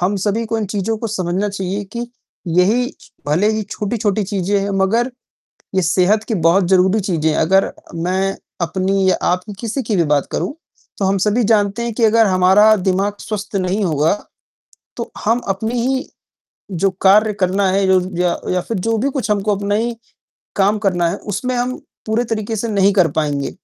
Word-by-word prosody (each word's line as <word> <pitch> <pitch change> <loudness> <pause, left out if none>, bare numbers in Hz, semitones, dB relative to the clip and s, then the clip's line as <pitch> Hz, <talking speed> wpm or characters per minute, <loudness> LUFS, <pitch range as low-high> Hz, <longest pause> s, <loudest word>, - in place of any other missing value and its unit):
हम 190 +3 +1
सभी 205 +4 -1
को 225 0 -1
इन 215 - -1
चीज़ों 205 +3 -2
को 230 - -3
समझना 195 -1 -1
चाहिए 195 +1 -3
कि 235 0 -4 0.5
यही 230 +8 +3 0.4
भले 170 +9 +2
ही 215 0 -1
छोटी-छोटी 210 0 -2
चीज़ें 200 0 0
हैं, 200 +1 -2
मगर 200 +6 +1 0.6
ये 190 - +2
सेहत 185 +5 +2
की 225 - 0
बहुत 175 +2 +3
ज़रूरी 190 +3 +3
चीज़ें 165 -5 0
हैं, 155 - 0
अगर 190 +4 +3 0.2
मैं 185 +3 -1 0.2
अपनी 190 +3 0
या - - +2
आपकी, 180 +4 -1
किसी 235 +4 -3
की 215 -3 -1
भी 170 - +3
बात 145 -2 +1
करूँ, - - -2 0.4
तो 200 - 0
हम 195 +1 +2
सभी 210 +5 +1
जानते 210 0 +2
हैं 235 -1 -2
कि 230 - +1
अगर 225 0 +5
हमारा 190 +3 +5
दिमाग 195 +1 0
स्वस्थ 205 -1 -4
नहीं 190 +2 0
होगा, 155 0 +2 0.9
तो - - -5
हम 230 +3 +3
अपनी 220 +5 -1
ही 265 +2 -1 0.6
जो 190 +2 +1
कार्य 210 +3 +5
करना 190 +1 +2
है, 195 +1 +2
यो 190 -1 +4 0.2
या 180 -1 +1
या 180 - +1
फिर 225 - -1
जो 225 +5 0
भी 275 +5 0
कुछ 260 -5 -3
हमको 205 0 +1
अपना 205 +1 -1
ही 230 +2 -1 0.6
काम 200 +2 +2
करना 175 -3 +2
है, 180 - -2
उसमें 220 +5 -3
हम 245 +1 -1 0.3
पूरे 220 +2 0
तरीके 220 -1 -3
से 220 +2 -2
नहीं 200 -1 +3
कर 180 -6 +3
पाएँगे। 145 -2 -2
200 Hz, 190 wpm, -18 LUFS, 185-220 Hz, 0.9 s, अगर